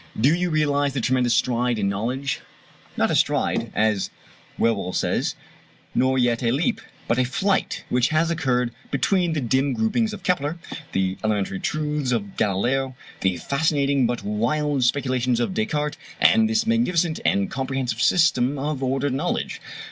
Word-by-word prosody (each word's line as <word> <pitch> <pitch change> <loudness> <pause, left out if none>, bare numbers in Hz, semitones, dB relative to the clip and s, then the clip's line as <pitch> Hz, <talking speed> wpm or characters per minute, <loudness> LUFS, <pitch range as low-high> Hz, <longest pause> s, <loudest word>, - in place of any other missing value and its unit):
Do 135 +8 +4
you 180 +1 0
realize 145 -3 +1
the 135 - -1
tremendous 125 0 +2
stride 125 -1 +1
in 100 -2 0
knowledge 125 +7 -2 0.6
not - - +2
a - - +2
stride, - - +1
as 105 -2 +1 0.5
Whewell 100 -5 0
says, - - 0 0.6
nor 130 +1 +2
yet 120 -2 +2
a 120 - +1
leap, 165 - 0 0.3
but 115 +2 +1
a - - +4
flight 195 +10 0
which 125 0 +2
has 160 +2 +1
occurred 125 -7 0 0.2
between 175 +4 +1
the 155 - -1
dim 130 +2 +1
gropings 120 - +1
of 205 -3 -8
Kepler, 165 -4 0 0.4
the 95 0 0
elementary 100 -3 -1
truths 150 -3 -1
of 100 -5 -2
Galileo, 125 +7 0 0.2
the 95 -2 +1
fascinating 140 -3 +1
but 120 0 -3
wild 130 +7 0
speculations 130 -2 +1
of 120 +10 -1
Descartes, 150 -9 -1 0.2
and 220 0 +5
this 220 0 +1
magnificent 180 -8 +1
and 100 -1 +1
comprehensive 130 -3 -2
system 145 -5 +3
of 145 0 -3
ordered 135 +1 0
knowledge. 155 +7 -2
135 Hz, 155 wpm, -23 LUFS, 120-155 Hz, 0.6 s, and